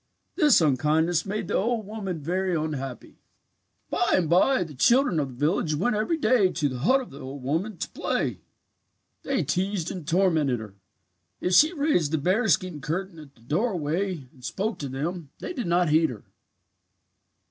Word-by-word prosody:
"This 300 Hz, -8 st, +5 dB
unkindness 155 Hz, +4 st, +2 dB
made 210 Hz, +2 st, -3 dB
the -, -, -3 dB
old 230 Hz, +1 st, 0 dB
woman 195 Hz, -6 st, -5 dB
very 185 Hz, +3 st, 0 dB
unhappy. 145 Hz, -5 st, -5 dB, 0.7 s
"By -, -, +1 dB
and 175 Hz, -3 st, +1 dB
bye 185 Hz, -, +3 dB
the 160 Hz, -3 st, -10 dB
children 235 Hz, -, +3 dB
of 140 Hz, -, 0 dB
the 125 Hz, -, -11 dB
village 155 Hz, -2 st, +1 dB
went 205 Hz, +9 st, 0 dB
every 220 Hz, +11 st, 0 dB
day 220 Hz, -7 st, +3 dB
to 155 Hz, -4 st, 0 dB
the 130 Hz, -1 st, -5 dB
hut 255 Hz, -, +3 dB
of 255 Hz, -, -10 dB
the 140 Hz, -, -11 dB
old 135 Hz, 0 st, -8 dB
woman 170 Hz, +9 st, -2 dB
to -, -, -3 dB
play. -, -, -2 dB, 0.8 s
"They 270 Hz, -10 st, -1 dB
teased 185 Hz, +4 st, -1 dB
and 175 Hz, -5 st, -7 dB
tormented 165 Hz, -8 st, +2 dB
her. 105 Hz, -3 st, -9 dB, 0.7 s
If 180 Hz, -, -1 dB
she 310 Hz, -, +7 dB
raised 285 Hz, -, +1 dB
the 160 Hz, -, +1 dB
bearskin 185 Hz, -, +1 dB
curtain 165 Hz, +4 st, -4 dB
at 140 Hz, -3 st, -14 dB
the 115 Hz, -, -24 dB
doorway 170 Hz, -, -1 dB
and 130 Hz, -4 st, -20 dB
spoke 210 Hz, -, -3 dB
to 140 Hz, -, -4 dB
them 155 Hz, +4 st, -4 dB
they 360 Hz, -, -6 dB
did 245 Hz, -, -4 dB
not 175 Hz, -1 st, +2 dB
heed 160 Hz, +1 st, +4 dB
her. 115 Hz, -5 st, -8 dB
175 Hz, 175 wpm, -26 LUFS, 150-205 Hz, 0.8 s, she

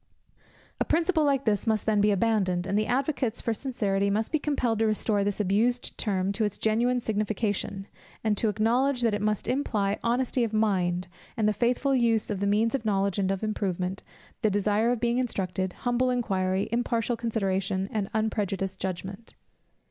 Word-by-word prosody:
A -, -, +3 dB
principle 330 Hz, 0 st, +2 dB
like 275 Hz, -2 st, +1 dB
this 210 Hz, 0 st, +1 dB
must 220 Hz, -1 st, +1 dB
then 210 Hz, -2 st, +2 dB
be 210 Hz, -, +4 dB
abandoned, 195 Hz, -4 st, +1 dB
and 195 Hz, +1 st, -1 dB
the 215 Hz, +1 st, +1 dB
advocates 255 Hz, -2 st, 0 dB
for 230 Hz, -, -1 dB
sincerity 205 Hz, -6 st, -1 dB
must 215 Hz, +2 st, -1 dB
be 310 Hz, -, +2 dB
compelled 250 Hz, -7 st, 0 dB
to 225 Hz, -, +3 dB
restore 215 Hz, -1 st, +1 dB
this 205 Hz, 0 st, -2 dB
abused 220 Hz, +5 st, +1 dB
term 195 Hz, -3 st, -1 dB
to 220 Hz, +2 st, -1 dB
its 205 Hz, -1 st, -1 dB
genuine 235 Hz, +3 st, +1 dB
signification, 210 Hz, -3 st, -2 dB, 0.4 s
and 215 Hz, -2 st, +2 dB
to 220 Hz, +2 st, +1 dB
acknowledge 245 Hz, +5 st, +1 dB
that 230 Hz, -2 st, +2 dB
it 205 Hz, -, -1 dB
must 210 Hz, -1 st, -1 dB
imply 210 Hz, -7 st, 0 dB
honesty 245 Hz, +1 st, +1 dB
of 225 Hz, -2 st, -2 dB
mind, 185 Hz, -4 st, +1 dB, 0.3 s
and 215 Hz, -2 st, +2 dB
the 215 Hz, -, +3 dB
faithful 250 Hz, +5 st, +1 dB
use 230 Hz, -4 st, +2 dB
of 200 Hz, -, -2 dB
the 200 Hz, -, 0 dB
means 215 Hz, +3 st, +2 dB
of 275 Hz, -, -1 dB
knowledge 200 Hz, -2 st, 0 dB
and 190 Hz, -1 st, +1 dB
of 195 Hz, +1 st, -2 dB
improvement, 190 Hz, -3 st, -2 dB, 0.4 s
the 215 Hz, -, +3 dB
desire 205 Hz, +3 st, +1 dB
of 245 Hz, -1 st, 0 dB
being 240 Hz, +1 st, +1 dB
instructed, 190 Hz, -6 st, -2 dB
humble 245 Hz, 0 st, 0 dB
inquiry, 190 Hz, -6 st, 0 dB
impartial 235 Hz, 0 st, 0 dB
consideration, 195 Hz, -4 st, -1 dB
and 205 Hz, -3 st, -2 dB
unprejudiced 195 Hz, -3 st, -1 dB
judgment. 190 Hz, +4 st, -5 dB
215 Hz, 180 wpm, -27 LUFS, 195-235 Hz, 0.4 s, be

